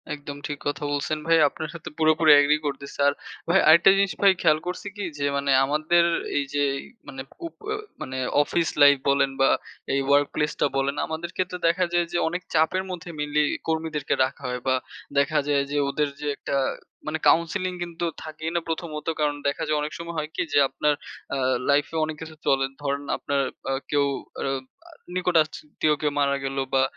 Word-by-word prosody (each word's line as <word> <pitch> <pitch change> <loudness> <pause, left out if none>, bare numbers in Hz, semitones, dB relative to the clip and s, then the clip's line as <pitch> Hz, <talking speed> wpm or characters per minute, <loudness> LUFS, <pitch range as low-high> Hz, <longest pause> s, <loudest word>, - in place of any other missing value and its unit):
একদম 145 -1 -8
ঠিক 150 - -4
কথা 145 +1 -2
বলছেন 145 +2 -1
ভাই। 165 0 +5
আপনার 155 +2 -6
সাথে 170 - -8
পুরোপুরি 155 0 +5
agree 150 +1 +2
করতেছি। 140 0 -6
আর 140 - +3 0.4
ভাই 185 +3 +5
আরেকটা 170 +4 +8
জিনিস 195 0 +2
ভাই 200 -1 +7
খেয়াল 155 -2 +4
করছি 180 +2 -4
কি? 205 - -5
যে 140 - -1
মানে 140 0 0
আমাদের 155 +4 +3 0.3
এই 145 - +2
যে 145 0 +2
এই - - -7 0.2
মানে 135 -1 -7 0.3
উপ - - -13 0.2
আ - - +1 0.3
মানে 130 0 -5 0.3
অফিস 165 +2 0
লাইফ 145 0 +8
বলেন 140 0 +3
বা 135 - +5 0.4
এই 135 - +2
workplace 145 +1 +2
টা - - +5
বলেন, 135 +1 0
আমাদের 160 +2 -5
ক্ষেত্রে 180 -1 -1
দেখা 180 +2 +2
যায় 175 0 +3
যে - - +2
অনেক 180 +2 -3
চাপের 160 +4 +2
মধ্যে 180 0 -7
mainly 150 0 +1 0.2
কর্মীদেরকে 160 -3 -1
রাখা 130 - -8
হয়। 125 0 -3
বা 130 - +4 0.4
দেখা 140 +2 +3
যায় 140 -1 +2
যে 145 - -1
ওদের 150 +1 0
যে 150 - -3
একটা - - -3 0.5
মানে 155 +1 -1
counseling 180 +2 +2
কিন্তু 170 0 -4 0.2
থাকেই 155 +1 -5
না 170 - +2
প্রথমত। 160 -2 -4
কারণ 150 -1 +1
দেখা 140 - -1
যায় 155 0 +1
অনেক 150 +1 -3
সময় 170 0 -7
হয় 155 0 -2
কি? - - 0
যে 145 - +5
আপনার 150 +2 +1 0.4
আ - - -1 0.3
life 145 +1 +3
এ - - -5
অনেক 155 0 -5
কিছু 160 -1 -8
চলে, 135 -1 +3 0.2
ধরেন 140 0 -2
আপনার 140 -1 -1 0.3
আ - - +1 0.2
কেউ 145 -1 +3 0.4
আ - - -2 0.7
নিকটাত্মীয় 155 -3 +1
কেউ 150 -1 +1
মারা 140 -1 +2
গেল 135 0 -3 0.2
বা 135 0 +4
150 Hz, 190 wpm, -25 LUFS, 145-165 Hz, 0.7 s, আরেকটা